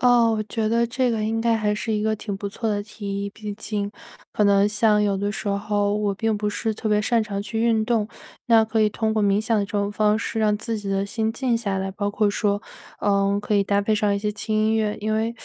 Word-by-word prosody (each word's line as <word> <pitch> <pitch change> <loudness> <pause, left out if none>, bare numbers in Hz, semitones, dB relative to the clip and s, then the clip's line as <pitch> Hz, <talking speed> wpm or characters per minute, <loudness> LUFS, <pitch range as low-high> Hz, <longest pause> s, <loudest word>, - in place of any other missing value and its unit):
哦， 240 -2 +5
我 - - 0
觉 215 0 -2
得 235 +1 +2
这 245 +1 0
个 220 -2 -1
应 225 +1 -1
该 230 -1 +2
还 210 -1 0
是 220 +1 -3
一 210 -1 0
个 220 0 +2
挺 205 -1 -5
不 200 +1 -4
错 220 +3 -3
的 205 -1 0
提 200 -2 -5
议， - - -3
毕 210 0 -7
竟 205 -1 -3 0.4
可 210 - +2
能 200 0 +4
像 210 0 +3
有 200 -1 +1
的 205 +1 -1
时 205 - -4
候 205 0 0
我 205 -1 0
并 220 +2 0
不 210 0 -1
是 220 +2 -2
特 215 +1 -4
别 210 0 +2
擅 235 +1 +2
长 200 -2 -4
去 225 +2 -3
运 225 -2 +2
动， 225 -3 +1 0.4
那 225 -2 +5
可 220 0 0
以 215 - +4
通 220 +1 -1
过 220 - +1
冥 205 0 +3
想 220 0 +1
的 200 - +1
这 200 - -12
种 205 -1 0
方 210 0 +2
式 225 0 -3
让 210 -1 +2
自 225 0 -3
己 205 - -6
的 195 0 0
心 220 +2 -2
静 240 -1 0
下 200 -4 -2
来， 190 0 -2
包 205 +1 -2
括 205 0 +1
说， 205 0 0 0.4
呃， 200 0 +2
可 205 0 +1
以 200 - +3
搭 200 0 +2
配 215 - 0
上 210 -1 +2
一 200 - 0
些 210 0 -1
轻 215 +1 -3
音 215 +1 +2
乐， 215 -1 0
因 215 +1 -1
为 225 +2 -1
210 Hz, 290 characters per minute, -23 LUFS, 205-220 Hz, 0.4 s, 哦